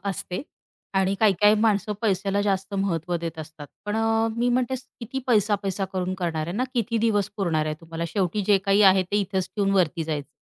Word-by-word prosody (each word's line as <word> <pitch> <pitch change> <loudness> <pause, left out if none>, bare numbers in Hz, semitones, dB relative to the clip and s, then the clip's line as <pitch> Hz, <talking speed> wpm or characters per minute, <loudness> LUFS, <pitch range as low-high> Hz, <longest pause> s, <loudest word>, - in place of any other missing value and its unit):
असते 190 -1 -3 0.6
आणि 190 0 +2
काही-काही 205 0 +5
माणसं 210 -1 +2
पैशाला 195 -1 +1
जास्त 195 0 -1
महत्व 175 -3 -1
देत 165 -1 -5
असतात. 155 -1 -9 0.2
पण 210 +1 -2
अ, 225 0 +2
मी 240 +1 +1
म्हणते 250 +1 +1 0.3
किती 250 +3 -4
पैसा-पैसा 205 -4 +1
करून 185 0 -2
करणार 165 -4 -2
आहे 170 - -4
ना, 255 - +1
किती 230 -1 0
दिवस 210 -3 +1
पुरणार 165 -6 0
आहे 155 - -1
तुम्हाला 165 0 -5
शेवटी 190 +3 -1
जे 205 -2 +5
काही 195 +1 +4
आहे 190 -1 +6
ते, 185 +3 -2
इथेच 195 -2 -1
ठेऊन 200 -1 +2
वरती 170 -3 +1
जायचंय. 150 -3 -4
195 Hz, 190 wpm, -25 LUFS, 175-210 Hz, 0.6 s, आहे